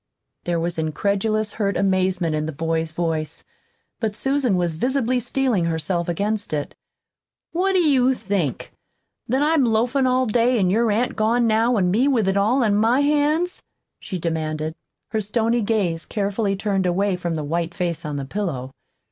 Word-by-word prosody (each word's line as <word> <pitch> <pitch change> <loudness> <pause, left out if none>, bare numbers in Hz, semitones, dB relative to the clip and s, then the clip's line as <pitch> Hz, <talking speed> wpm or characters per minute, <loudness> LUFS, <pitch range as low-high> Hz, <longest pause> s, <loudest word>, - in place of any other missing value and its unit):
There 175 -1 0
was 170 0 -2
incredulous, 200 +7 0
hurt 200 -3 -1
amazement 185 -3 +1
in 155 0 -1
the - - -3
boy's 160 +1 -2
voice; 160 -2 -3 0.6
but 215 -3 -2
Susan 270 -3 +1
was 175 -2 0
visibly 255 - 0
steeling 245 -7 0
herself 170 +2 -1
against 205 +2 -2
it. 145 -1 -2 0.8
"What 380 +3 +1
do 370 - +4
you 265 -5 +3
think? 185 - -2 0.6
that 265 +5 +1
I'm 310 -1 +3
loafin' 245 +3 +2
all 255 0 +2
day, 240 +2 +2
an' 185 -4 +2
your 230 +3 +2
aunt 240 +4 0
gone 230 +2 +2
now, 230 +2 +2
an' 180 -3 +2
me 240 +8 +3
with 235 -8 +2
it 195 - +1
all 225 +7 +2
on 205 -2 +2
my 230 +6 +3
hands?" 300 +5 +1 0.4
she 185 - -5
demanded, 155 -2 -2 0.4
her 220 -1 -1
stony 230 +3 0
gaze 195 -7 -1
carefully 200 0 -1
turned 195 -2 0
away 190 +2 +1
from 175 -2 -3
the 155 - -3
white 165 +3 -2
face 175 -3 -2
on 150 -1 -4
the 140 -1 -3
pillow. 135 -7 -4
205 Hz, 170 wpm, -22 LUFS, 170-240 Hz, 0.8 s, do